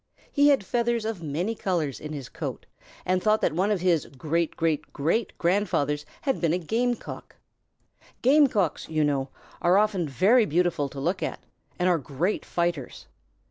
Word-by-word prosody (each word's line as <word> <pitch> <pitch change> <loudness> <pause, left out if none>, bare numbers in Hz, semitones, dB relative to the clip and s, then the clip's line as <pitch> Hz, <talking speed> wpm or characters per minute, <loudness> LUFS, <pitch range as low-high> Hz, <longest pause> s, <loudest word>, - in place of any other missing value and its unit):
He 285 0 +4
had 275 -9 +4
feathers 235 0 0
of 220 -5 -3
many 165 +8 -2
colors 170 - -2
in 150 - -7
his 140 -4 -6
coat, - - -6 0.4
and 185 0 +1
thought 215 +1 +3
that - - +1
one 185 +5 +1
of 205 -4 0
his 175 -4 +2
great 160 +5 -2
great 160 -2 -1
great 165 +11 -1
grandfathers 165 -6 0
had 270 -3 -1
been 165 -2 +2
a - - +2
Game 235 +8 0
Cock. - - -10 0.9
Game 285 +3 +6
Cocks, 200 - -1
you 155 -1 +1
know, 140 -2 0 0.3
are 175 +2 +4
often 200 -6 +1
very 210 - +4
beautiful 165 -3 +1
to 135 - -8
look 175 +7 -1
at, - - -3 0.4
and 180 - +1
are 175 -2 +3
great 155 +8 -2
fighters. 170 -6 -2
175 Hz, 175 wpm, -26 LUFS, 150-215 Hz, 0.9 s, Game